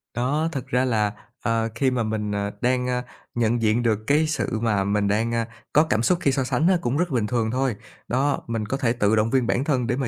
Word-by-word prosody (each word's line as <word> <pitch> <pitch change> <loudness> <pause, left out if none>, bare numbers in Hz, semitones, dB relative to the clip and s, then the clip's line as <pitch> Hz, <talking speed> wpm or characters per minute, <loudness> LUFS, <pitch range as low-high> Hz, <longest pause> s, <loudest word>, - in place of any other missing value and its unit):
Đó, 145 +7 0
thực 135 -4 -5
ra 130 -1 +1
là, 105 -4 +1 0.3
ờ, 115 -1 0
khi 130 +2 +2
mà 125 -2 0
mình, 110 -1 -2
ờ, 100 0 -2
đang, 125 0 +1
a, 125 0 -1 0.3
nhận 115 0 +1
diện 110 +2 +2
được 110 -3 +2
cái 150 +2 +3
sự 155 -7 -1
mà 105 -4 +1
mình 100 0 +1
đang, 115 +3 +1
a, 115 -1 0 0.3
có 150 - +6
cảm 110 -9 0
xúc 180 +7 +3
khi 140 - +3
so 135 -1 0
sánh 155 +6 +1
á, 185 - +4
cũng 125 +4 -1
rất 175 0 +1
bình 120 -6 0
thường 110 -1 0
thôi. 130 -2 0 0.3
Đó, 135 +4 0
mình 115 -2 -2
có 130 +6 -2
thể 120 -4 +1
tự 110 -2 +2
động 110 +1 +2
viên 125 -1 +1
bản 125 - +1
thân 130 -5 0
để 125 - +1
mà 135 -3 -1
120 Hz, 255 wpm, -24 LUFS, 110-135 Hz, 0.3 s, có